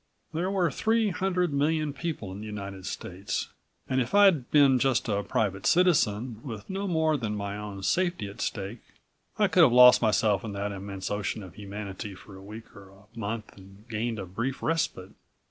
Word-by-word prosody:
There 175 +4 -1
were 185 -5 +1
three 220 - +1
hundred 180 -3 0
million 150 +1 +1
people 140 - -4
in 95 - -7
the 110 - -7
United 100 -3 -6
States, 95 +2 -4 0.4
and 130 0 +1
if 125 +10 -2
I'd 190 -11 +5
been 140 -3 +5
just 130 -1 +1
a 100 -2 0
private 100 -1 -1
citizen, 125 - +2
with 110 -6 -7
no 195 +1 -3
more 160 -3 +2
than 110 -5 -3
my 100 -1 -4
own 105 -2 -7
safety 175 - +1
at 100 +4 -9
stake, 100 +2 -3 0.6
I 210 - +4
could 185 -1 +4
have 150 -7 +7
lost 125 0 +8
myself 105 -2 +2
in 105 -3 -5
that 100 +1 -3
immense 100 0 -6
ocean 105 +1 -2
of 90 -3 -11
humanity 100 -1 -7
for 95 +1 -13
a 95 - -11
week 110 +3 -11
or 100 -1 -13
a 95 +1 -19
month 110 -1 -5
and 95 +3 -16
gained 115 +1 -2
a 100 - -5
brief 115 +9 -4
respite. 160 - -1
110 Hz, 190 wpm, -28 LUFS, 100-155 Hz, 0.6 s, lost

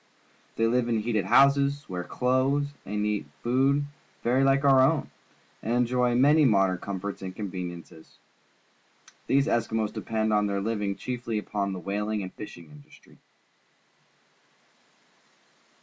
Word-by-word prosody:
They 115 - +1
live 120 +1 +1
in 115 -2 +1
heated 110 -3 -1
houses, 140 +5 +3
wear 90 -1 -4
clothes 135 +6 0
and 105 +1 -2
eat 105 -7 -2 0.2
food 135 +4 +2 0.4
very 125 +3 +2
hke 135 +1 +3
our 135 -2 +6
own, 145 +3 +2 0.5
and 115 - -2
enjoy 125 0 +1
many 145 +5 +5
modem 95 -7 +3
comforts 100 +1 -5
and 95 -1 -6
conveniences. 90 -5 -7 1.1
These 140 0 +3
Eskimos 115 -5 -1
depend 110 -1 -2
foi 105 - +3
tiieir 100 -1 -1
living 105 -2 -2
cliiefly 120 -2 -4
upon 100 -1 -3
the 95 - -5
whaling 105 +2 -2
and 95 - -8
fishing 85 -7 -10
industry. 75 -1 -18
110 Hz, 130 wpm, -27 LUFS, 100-130 Hz, 1.1 s, our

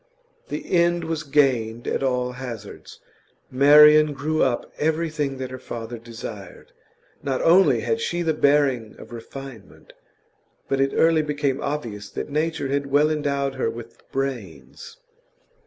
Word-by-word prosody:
The - - -6
end 170 0 +2
was 160 -1 -3
gained 130 -6 +1
at - - -1
all 125 -2 0
hazards. 120 -5 -9 0.5
Marian 150 +2 +7
grew 155 +3 -1
up 125 -3 0
everything 155 -3 -1
that 130 -1 -6
her 130 - -7
father 115 0 -7
desired. 115 0 -10 0.5
Not 135 -2 -2
only 185 +3 +5
had 460 0 -1
she 175 - -2
the 160 -1 +1
bearing 140 -6 +1
of - - -13
refinement, 120 0 -11 0.7
but 135 0 0
it 135 - +2
early 165 -1 +4
became 145 -2 -2
obvious 115 -8 -4
that - - -6
nature 155 -2 -1
had 140 0 -1
well 145 +3 +3
endowed 140 -2 -1
her 130 -3 -1
with 115 0 -10
brains. 130 - -5
140 Hz, 140 wpm, -23 LUFS, 125-150 Hz, 0.7 s, Marian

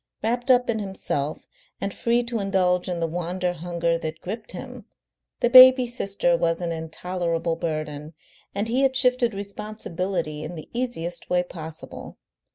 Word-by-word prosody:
Wrapped 240 +3 0
up 250 -1 +5
in 220 -2 0
himself, 185 -7 -3 0.3
and 200 -1 -2
free 240 +1 +1
to 235 -1 -3
indulge 185 -2 +1
in 175 -1 -2
the 165 - +1
wander 175 +2 -2
hunger 170 0 -1
that 160 -1 -5
gripped 215 +5 -6
him, - - -8 0.6
the 240 - +3
baby 255 0 +10
sister 195 -7 +1
was 165 0 +1
an 175 -1 -2
intolerable 165 +1 -2
burden, 155 -2 -4 0.4
and 205 +2 -1
he 245 +4 +1
had 265 -1 +3
shifted 250 -4 +2
responsibility 190 -5 -4
in 160 +3 -6
the 155 - -9
easiest 230 -9 -3
way 180 0 +2
possible. 160 -3 -9
180 Hz, 155 wpm, -24 LUFS, 165-230 Hz, 0.6 s, baby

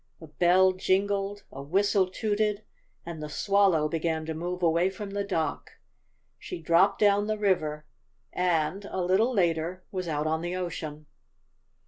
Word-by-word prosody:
A 165 - -10
bell 180 +5 +3
jingled, 195 +2 0
a 135 - -8
whistle 190 +5 +1
tooted 210 +1 -1 0.4
and 165 -2 -7
the 150 - -5
Swallow 195 -3 +2
began 160 0 -2
to 160 - -3
move 175 +3 -4
away 170 +2 +3
from 195 +1 -7
the 200 0 -2
dock. 165 -6 -3 0.7
She 360 - -7
dropped 185 +4 +3
down 205 0 +3
the 215 0 -1
river 155 -7 0 0.5
and, 180 +1 0
a 190 - -5
little 195 +7 +2
later, 175 -3 0
was 185 -2 -4
out 150 -1 -1
on 160 +1 0
the 175 +1 -3
ocean. 155 -4 -5
180 Hz, 150 wpm, -27 LUFS, 160-200 Hz, 0.7 s, bell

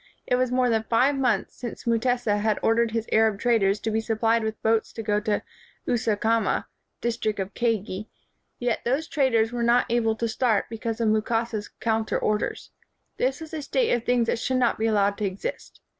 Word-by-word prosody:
It 250 - +2
was 250 0 +1
more 250 0 +2
than 225 -2 +2
five 260 +5 +3
months 245 -7 0
since 240 -2 -7
Mutesa 235 -2 +1
had 215 0 +1
or 225 - +4
dered 235 0 +2
his 225 0 -2
Arab 220 -2 +3
traders 210 -4 +2
to 220 - -2
be 220 +1 +1
supplied 225 0 +1
with 220 0 -3
boats 225 0 +2
to 225 - -6
go 210 -1 +1
to 210 0 -1 0.4
Usukuma, 225 -1 +1 0.4
[district 230 -2 -1
of 190 0 -4
Kagei] 215 -3 -1 0.5
yet 240 -2 -1
those 275 +7 0
traders 235 -6 +2
were 240 -1 -3
not 235 +1 +4
able 225 -2 +2
to 230 +1 -1
start 225 -2 0
be 225 - -6
cause 230 -1 -3
of 225 - +3
Mukasa 225 +1 0
's - - -11
counter 220 -1 0
orders. 210 0 -2 0.5
This 265 +4 0
was 320 -1 -9
a 310 - -3
state 475 - 0
of 240 - +1
things 245 -1 +2
that 230 - -1
should 260 +2 0
not 245 -3 +1
be 225 - +1
al 220 - +1
lowed 200 0 +2
to 210 - 0
exist. 190 0 -5
225 Hz, 205 wpm, -25 LUFS, 215-240 Hz, 0.5 s, or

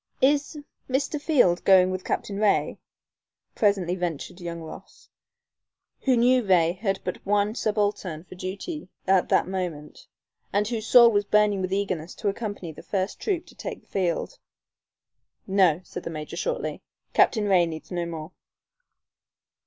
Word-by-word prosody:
"Is 290 +2 +2 0.3
Mr. 285 +3 -1
Field 245 - +3
going 185 -1 +6
with 185 0 -4
Captain 200 -1 -3
Ray?" 210 -1 +1 0.7
presently 195 -5 +1
ventured 175 0 -4
young 170 -1 -5
Ross, 160 -1 -12 0.9
who 260 -3 +2
knew 250 +1 +4
Ray 175 -5 +4
had 195 +1 -2
but - - -5
one 205 +1 +1
subaltern 205 -7 -1
for 185 - -13
duty 195 - -6 0.2
at 190 -1 +3
the - - +4
moment, 180 -5 -5 0.4
and 205 +1 +1
whose 225 -1 -3
soul 235 -2 +8
was 205 -1 +2
burning 210 -1 +3
with 185 0 -2
eagerness 185 -4 -2
to 210 - -1
accompany 205 -5 -5
the 155 - -12
first 195 -1 -3
troop 360 -4 -1
to - - -16
take - - -7
the - - -33
field. 190 - -2 1.1
"No," 185 -4 +3
said - - -7
the - - -6
major, 155 -2 -6
shortly. - - -3 0.3
"Captain 215 -4 +3
Ray 180 -3 +4
needs 160 +2 -8
no 175 -1 -2
more." 160 0 -7
195 Hz, 150 wpm, -25 LUFS, 175-215 Hz, 1.1 s, soul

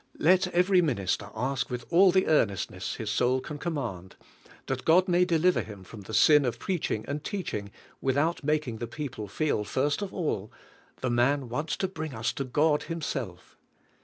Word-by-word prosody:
Let 185 +3 +4
every 180 +1 +3
min 150 -8 0
ister 100 +1 -2
ask 125 +1 -1
with 120 -1 -5
all 185 +2 +6
the 185 +1 +3
earnestness 100 - 0
his - - -4
soul 125 +1 +2
can 145 +3 -7
com 170 +2 -2
mand, 95 -10 -5 0.5
that 130 -1 -3
God 180 +4 +4
may 180 0 +4
deliver 175 +1 +2
him 100 -3 -10
from 105 +3 -11
the 105 +3 -10
sin 150 +5 +6
of 120 -2 -1
preaching 150 - -2
and 145 +1 -4
teaching 135 - -4 0.3
without 145 +6 +1
making 150 -6 0
the 115 - -4
people 130 -5 -6
feel 145 -1 0
first 140 - 0
of 200 -2 -4
all: 110 - -2 0.5
"The 130 - 0
man 125 +2 +2
wants 150 +7 -2
to 190 - 0
bring 160 -7 -6
us 110 +1 -1
to 140 - -3
God 150 +4 +2
Himself. 165 -2 -5
140 Hz, 185 wpm, -28 LUFS, 120-165 Hz, 0.5 s, all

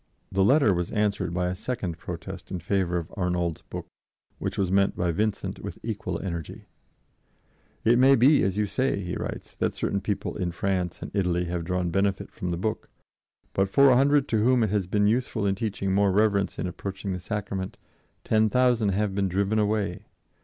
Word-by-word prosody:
The 95 0 +2
letter 130 -2 +5
was 90 -1 -2
answered 105 -4 0
by 90 +1 -1
a - - -1
second 95 -6 -4
protest 90 +2 -7
in 95 - -3
favor 90 0 0
of 85 0 -4
Arnauld's 90 -3 -1
book, - - -7 0.5
which - - -3
was 95 -2 0
met 100 0 +3
by 90 -1 0
Vincent 105 +5 -2
with - - -7
equal 110 -1 -3
energy: 85 -4 -5 1.2
"It 120 +2 +5
may 135 +2 +7
be, 135 +4 +5
as 95 +1 0
you 105 - +2
say," 130 +1 0
he 90 0 -4
writes, - - -6
"that - - -1
certain 100 - -1
people 100 0 -3
in 90 -4 -2
France 90 -1 -2
and - - -7
Italy 90 -3 +1
have 85 -1 -3
drawn 90 -1 -1
benefit 95 +1 0
from 90 - -4
the 85 - -1
book; 110 +5 -3 0.6
but 95 0 +1
for 140 +6 +6
a - - +5
hundred 140 +2 +4
to 110 -2 +2
whom 125 0 +4
it 105 - 0
has 100 -4 0
been 105 +2 +2
useful 110 -1 +1
in 100 - +2
teaching 100 -2 -2
more 100 0 +3
reverence 100 -1 +2
in - - -2
approaching 95 +2 -4
the 90 - -4
Sacrament, 100 -1 -4 0.5
ten 110 0 +3
thousand 120 -2 +3
have 100 +1 0
been 100 -1 0
driven 100 +4 +1
away 105 -2 -1
100 Hz, 195 wpm, -26 LUFS, 90-110 Hz, 1.2 s, may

